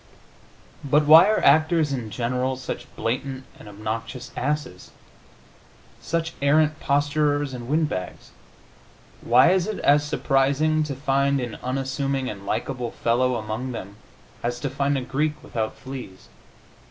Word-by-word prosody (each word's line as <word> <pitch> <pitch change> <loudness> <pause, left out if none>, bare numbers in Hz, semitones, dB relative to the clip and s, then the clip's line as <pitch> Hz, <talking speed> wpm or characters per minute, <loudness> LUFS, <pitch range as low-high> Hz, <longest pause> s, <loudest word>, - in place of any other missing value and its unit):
But 145 +2 +3
why 160 +5 +9
are 215 - +1
actors, 155 0 +4
in 120 -5 -4
general, 125 +4 -1
such 130 - -6
blatant 130 +4 -3 0.2
and 105 - -11
obnoxious 110 +4 -5
asses, 150 -12 -3 1.1
such 165 +6 -2
arrant 155 +2 +3
posturers 145 0 +1
and 120 -1 -7
wind 155 +3 +2
bags? 90 -9 -6 0.9
Why 125 +7 +5
is 185 0 +2
it 215 - -3
as 145 +1 +4
surprising 145 +2 +1
to 140 -2 -4
find 140 0 +1
an 120 -3 -5
unassuming 135 0 -2
and 100 -1 -10
likable 120 +2 -2
fellow 125 +3 +1
among 110 +3 -4
them 100 -2 -8 0.4
as 120 +1 -2
to 140 - -2
find 140 +1 0
a - - -2
Greek 150 +4 -1
without 110 -2 -3
fleas? 130 -8 -9
135 Hz, 135 wpm, -24 LUFS, 120-150 Hz, 1.1 s, why